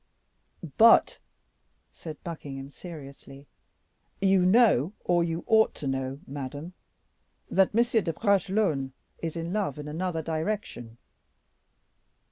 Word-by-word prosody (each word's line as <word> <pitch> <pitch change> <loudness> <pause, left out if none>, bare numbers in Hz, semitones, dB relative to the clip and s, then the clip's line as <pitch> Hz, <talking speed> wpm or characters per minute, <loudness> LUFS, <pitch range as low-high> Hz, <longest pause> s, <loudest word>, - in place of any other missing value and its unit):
"But," 230 +1 +6 0.7
said 155 -3 -10
Buckingham, 140 -5 -7
seriously, 140 -4 -11 0.7
"you 195 -1 +3
know, 205 - +4
or 175 -1 +3
you 165 0 -3
ought 220 -1 +3
to - - -7
know, 135 +1 -3
madame, 145 +5 -7 0.8
that 195 +1 +3
M. 235 -2 +3
de 165 - -1
Bragelonne 190 - 0 0.3
is 165 -1 -4
in 165 +1 -4
love 200 -10 -1
in 150 0 -7
another 165 +1 -3
direction." 160 - -4
165 Hz, 105 wpm, -27 LUFS, 140-195 Hz, 0.8 s, But